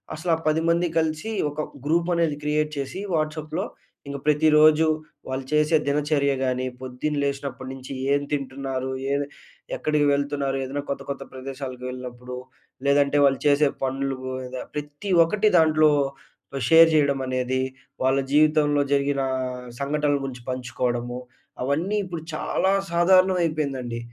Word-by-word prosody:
అసలు 165 +2 -2
ఆ - - -5
10 155 +1 +2
మంది 170 +1 +2
కలిసి 160 +5 -1 0.2
ఒక 150 +1 -3 0.2
గ్రూప్ 170 +3 +1
అనేది 165 -3 +1
క్రియేట్ 150 0 +1
చేసి, 140 +7 -4 0.2
వాట్సాప్‌లో 155 0 -2 0.4
ఇంక 140 0 -4
ప్రతిరోజు 155 +1 +5 0.4
వాళ్ళు 130 0 -3
చేసే 150 +1 +3
దినచర్య 145 -1 +1
గాని, 130 0 0 0.2
పొద్దున్న 130 +4 -3
లేసినప్పటి 135 -2 -3
నుంచి 130 0 -10 0.2
ఏం 140 0 +3
తింటున్నారు, 135 -1 -3 0.2
ఏం 140 - +1 0.5
ఎక్కడికి 150 -1 +1
వెళ్తున్నారు, 140 -1 -1
ఏదైనా 140 +2 -4
కొత్త, 140 0 -2
కొత్త 140 -1 -4
ప్రదేశాలకు 130 -1 -7
వెళ్ళినప్పుడు, 125 0 -7 0.5
లేదంటే 140 0 +3
వాళ్ళు 135 -1 +3
చేసే 145 0 +5 0.2
పనులు, 135 0 -1 0.3
ఇలా 125 0 -6
ప్రతి 150 +6 -5
ఒక్కటి 210 +5 +2
దాంట్లో 155 -1 +5 0.6
ఆహ్, 135 - -2
షేర్ 165 0 +8
చేయడం 140 -2 +3
అనేది 130 0 0 0.4
వాళ్ళ 130 +1 +3
జీవితంలో 150 -1 +4
జరిగిన 140 0 +1 0.6
సంఘటనల 145 0 +1
గురించి 125 -3 -7
పంచుకోవడము, 120 -1 -2 0.4
అవన్నీ 160 +10 0
ఇప్పుడు 170 -3 -5
చాలా 190 +4 0 0.2
సాధారణం 185 +2 +4
అయిపోయిందండి. 135 -7 -2
145 Hz, 130 wpm, -24 LUFS, 130-155 Hz, 0.6 s, షేర్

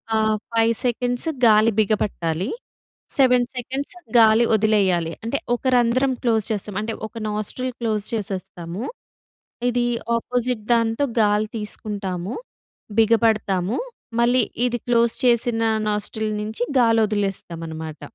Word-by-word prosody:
ఆహ్, 215 0 +2 0.2
5 230 0 +3
సెకండ్స్ 245 +4 0 0.2
గాలి 215 +1 +5
బిగపట్టాలి. 195 -3 0 0.7
7 250 -2 +4
సెకండ్స్ 265 +6 -4 0.2
గాలి 225 +1 +6
వదిలేయాలి. 195 -6 +2
అంటే 255 +5 -1 0.2
ఒకరంద్రం 255 +1 +2
క్లోజ్ 220 -3 +2
చేస్తాం. 205 -1 -3
అంటే 225 +1 -3
ఒక - - -42 0.2
నోస్ట్రిల్ 230 +5 -3
క్లోజ్ 215 -3 -1
చేసేస్తాము. 190 -2 -5 0.9
ఇది 245 0 +1 0.3
ఆపోజిట్ 245 -1 -2
దాంతో 230 +3 +2 0.2
గాలి 210 +1 +2
తీసుకుంటాము, 205 -2 -4 0.6
బిగపడతాము, 220 -3 +2 0.4
మళ్ళీ 245 +1 +4 0.2
ఇది 240 0 -1
క్లోజ్ 235 -1 +3
చేసిన 235 -1 +2 0.3
నోస్ట్రిల్ 215 +1 -2
నుంచి 220 +3 -4 0.2
గాలి 225 -1 +4
వదిలేస్తాం 195 -5 -2
అన్నమాట. 160 -1 -7
220 Hz, 110 wpm, -22 LUFS, 205-240 Hz, 0.9 s, గాలి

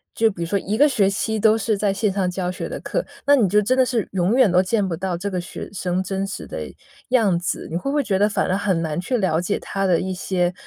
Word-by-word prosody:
就 225 -1 +3
比 175 - -9
如 170 - -2
说 200 - +1
一 200 +2 -2
个 295 +1 +5
学 210 -8 +2
期 220 +3 -1
都 220 +1 +5
是 220 -1 0
在 200 -1 +1
线 210 0 0
上 190 -2 0
教 180 -1 -2
学 185 - -5
的 - - -6
课， - - -2 0.2
那 285 - +7
你 235 -7 +3
就 210 +3 +3
真 255 +5 +1
的 260 - +5
是 245 -5 -1
永 185 +2 +1
远 255 -7 +5
都 180 +1 +4
见 205 +1 +1
不 170 - -2
到 185 0 -2
这 195 +4 -3
个 185 -2 -2
学 175 - -7
生 185 -2 -1
真 195 0 -2
实 195 - -6
的 - - -6 0.5
样 215 -9 +3
子。 175 - -3
你 165 - -2
会 - - -7
不 - - -3
会 290 - +2
觉 195 - 0
得 205 +2 +4
反 210 - 0
而 185 - +1
很 190 -4 0
难 160 0 -2
去 245 +8 -1
了 185 -7 +1
解 180 +4 -1
他 195 0 -3
的 180 -3 +3
一 190 - -3
些 180 -1 -1
195 Hz, 310 characters per minute, -22 LUFS, 180-220 Hz, 0.5 s, 那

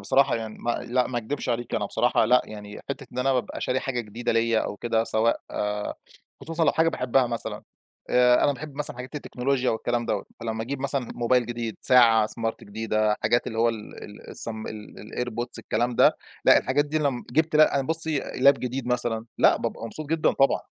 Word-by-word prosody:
بصراحة 135 +6 +3
يعني 110 -1 -6
ما 120 - -2
لا 125 +1 0
ما 120 -2 -2
أكدبش 130 +4 -4
عليكِ 120 0 -2
أنا 105 -2 0
بصراحة 120 +1 +2
لأ 125 +3 +4
يعني 105 -1 -9
حتّة 140 -1 -5
إن - - -6
أنا 135 +1 +2
بابقى 125 - -2
شاري 130 +1 0
حاجة 125 -2 -2
جديدة 115 +2 -3
ليّا 115 0 +2
أو 100 - -4
كده 115 0 0
سواء 115 +1 +1 1.0
خصوصًا 165 0 -1
لو - - +4
حاجة 165 0 +3
باحبها 130 -4 +1
مثلًا 120 -1 -5 0.5
آآ 125 0 +5
أنا 145 - +4
باحب 145 +1 -8
مثلًا 150 -1 -3
حاجات 130 +4 -8
التكنولوجيا 130 -2 -1
والكلام 120 +1 -1
دوّة، - - -2
فلمّا 110 -1 -3
أجيب 130 +3 -4
مثلًا 135 -3 -1
موبايل 120 0 +2
جديد، 115 -2 -4
ساعة 115 -4 +5
smart 115 -1 -2
جديدة، 110 0 0
حاجات 120 +3 +2
اللي 115 -2 -4
هو 115 +1 +4
ال 110 -2 -6
ال 105 - -12
السم 110 -1 -4
الairpods 120 +3 -6
الكلام 120 +2 -1
ده، - - +5 0.3
لأ - - +7
الحاجات 145 +3 +1
دي 155 +2 -1
لمّا 140 -5 -1
جبت 155 +1 +2
ل 145 -3 +5
بُصّي 160 -2 0
لاب 140 +2 +4
جديد 125 0 -3
مثلًا، 120 -2 -1
لا - - +5
بابقى 115 - -4
مبسوط 155 +6 -7
جدًا 165 -1 +2
طبعًا. 135 - +3
120 Hz, 195 wpm, -25 LUFS, 115-135 Hz, 1.0 s, لأ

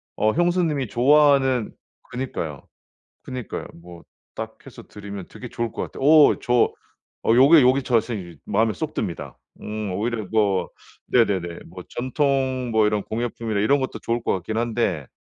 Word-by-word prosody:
어 110 +1 +2
형수님이 170 -6 +1
좋아하는 135 -1 +3 0.3
그니까요. 120 - -5 0.6
그니까요. 130 -3 -6
뭐 85 0 -13 0.3
딱 - - -6
해서 - - -12
드리면 100 -2 -9
되게 125 - -9
좋을 115 -1 -4
것 - - -4
같아요. - - -6
오 155 -1 +7
저 120 -1 +2 0.5
어 115 - +3
요게, 140 +5 +7
요게 130 +2 +4
저 125 -1 -3
선생님 95 -8 -7
마음에 110 +2 +1
쏙 - - -5
듭니다. - - -4 0.2
음 105 -2 -4
오히려 110 +1 -2
뭐 105 -4 +1 0.4
네네네 100 -7 +2 0.2
뭐 - - -10
전통 130 -1 -1
뭐 110 -1 +3
이런 105 -1 0
공예품이나 115 -1 -3
이런 140 +6 +3
것도 130 - -3
좋을 120 0 -2
것 - - 0
같긴 95 +4 -4
한데 115 -1 -1
120 Hz, 315 characters per minute, -23 LUFS, 105-130 Hz, 0.6 s, 오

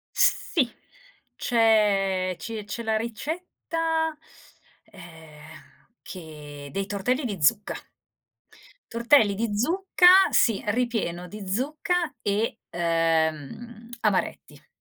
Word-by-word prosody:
Sì, 360 - +2 0.7
c'è 200 -5 +2
ci 220 +3 -6
c'è 235 +3 -5
la 220 -1 +1
ricetta, 320 +6 -3 0.7
ehm, 160 -3 -15
che 150 -5 -10
dei 195 0 -2
tortelli 225 +8 -1
di 200 -8 -4
zucca. 200 +8 +2 1.2
Tortelli 230 -3 +4
di 225 +2 -1
zucca 355 - +2 0.2
sì, 225 -5 +3
ripieno 210 -6 -1
di 210 +2 -9
zucca 305 - -1
e, 205 +3 -1
ehm, 165 - -1
amaretti. 210 -4 -2
215 Hz, 90 wpm, -25 LUFS, 180-245 Hz, 1.2 s, Tortelli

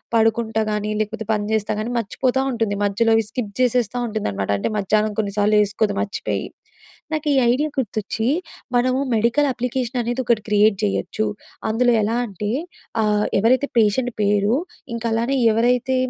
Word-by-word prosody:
పడుకుంటా 225 0 +2
కాని, 210 0 -2
లేకపోతే 220 +1 -3
పని 205 -1 -1
చేస్తా 215 -1 0
కాని 220 +3 -3
మర్చిపోతా 250 +4 0
ఉంటుంది. 225 -4 -1
మధ్యలోవి 225 +2 +2
స్కిప్ 225 -4 -4
చేసేస్తా 245 -2 +1
ఉంటుందన్నమాట. 100 - -3
అంటే - - -1
మధ్యాహ్నం 210 +1 +1
కొన్నిసార్లు 205 0 +1
వేసుకోదు 205 0 0
మర్చిపోయి. 210 -1 -3 0.7
నాకు 310 0 -2
ఈ - - +2 0.2
ఐడియా 295 +5 +1
గుర్తొచ్చి, 220 -2 -2 0.5
మనము 255 +2 +2
మెడికల్ 235 +6 +2
అప్లికేషన్ 250 0 -2
అనేది 240 +2 -2
ఒకటి 230 -2 +2
క్రియేట్ 210 -1 +4
చేయొచ్చు. 210 +1 -1 0.4
అందులో 240 +3 +3
ఎలా 215 +2 0
అంటే 205 -1 -5 0.5
ఆహ్, 210 -1 +2
ఎవరైతే 255 +6 +3
పేషెంట్ 230 +3 +3
పేరు, 205 +2 +2 0.4
ఇంక 235 -1 -4
అలానే 235 +4 0 0.2
ఎవరైతే 245 +3 +2
220 Hz, 140 wpm, -21 LUFS, 210-245 Hz, 0.7 s, క్రియేట్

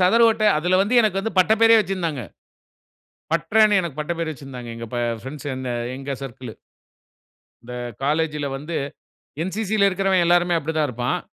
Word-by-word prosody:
சதுர 190 +6 +4
வட்டை 215 -1 +1
அதுல 180 +4 +2
வந்து 210 +5 -1
எனக்கு 210 -4 +1
வந்து 225 +3 -3
பட்ட 185 +4 +5
பெயரே 225 0 +7
வச்சுயிருந்தாங்க. 175 -8 -2 1.1
பட்றன்னு 205 +6 +4
எனக்கு 165 -5 -6
பட்ட 150 +3 -2
பெயர் 165 -1 -2
வச்சிருந்தாங்க 130 -4 -9
எங்க 115 0 -7 0.3
ஃபிரன்ஸ் 135 +5 -8 0.5
எங்க 135 +1 -4
சர்க்கிள். 125 -3 -8 1.1
இந்த 125 +1 -9 0.3
காலேஜ்‌ல 150 0 0
வந்து 155 +4 -6 0.7
என்சிசி 205 +4 -2
ல 200 - +6
இருக்கிறவன் 190 -2 +2
எல்லோருமே 175 0 +3
அப்டிதான் 155 -1 -1
இருப்பான். 125 0 -2
165 Hz, 145 wpm, -22 LUFS, 140-195 Hz, 1.1 s, பெயரே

